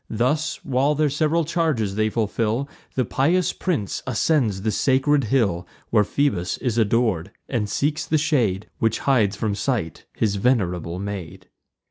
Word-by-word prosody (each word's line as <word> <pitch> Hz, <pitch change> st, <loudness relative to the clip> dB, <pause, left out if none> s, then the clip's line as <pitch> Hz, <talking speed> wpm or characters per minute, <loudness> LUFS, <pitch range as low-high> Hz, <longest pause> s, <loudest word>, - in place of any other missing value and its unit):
Thus, 150 Hz, +7 st, 0 dB
while 140 Hz, +2 st, +2 dB
their 150 Hz, -1 st, +1 dB
sev'ral 155 Hz, +3 st, +1 dB
charges 150 Hz, -, 0 dB
they 110 Hz, +1 st, +1 dB
fulfil, 115 Hz, +3 st, -1 dB, 0.3 s
The 130 Hz, -, +1 dB
pious 165 Hz, +10 st, +1 dB
prince 155 Hz, -, -2 dB
ascends 115 Hz, -6 st, +1 dB
the 110 Hz, -, +1 dB
sacred 135 Hz, +2 st, +2 dB
hill 100 Hz, -8 st, +1 dB, 0.2 s
Where 105 Hz, -2 st, +5 dB
Phoebus 100 Hz, -7 st, 0 dB
is 120 Hz, -3 st, -1 dB
ador'd; 110 Hz, -5 st, +1 dB, 0.2 s
and 110 Hz, -5 st, -1 dB
seeks 150 Hz, +6 st, -1 dB
the 155 Hz, -, +2 dB
shade 125 Hz, -, +1 dB
Which 110 Hz, -1 st, +1 dB
hides 110 Hz, -7 st, +3 dB
from 105 Hz, 0 st, -1 dB
sight 100 Hz, -, -2 dB
his 105 Hz, -2 st, +1 dB
venerable 90 Hz, -7 st, 0 dB
maid. 95 Hz, -4 st, -6 dB
115 Hz, 145 wpm, -23 LUFS, 100-145 Hz, 0.3 s, Where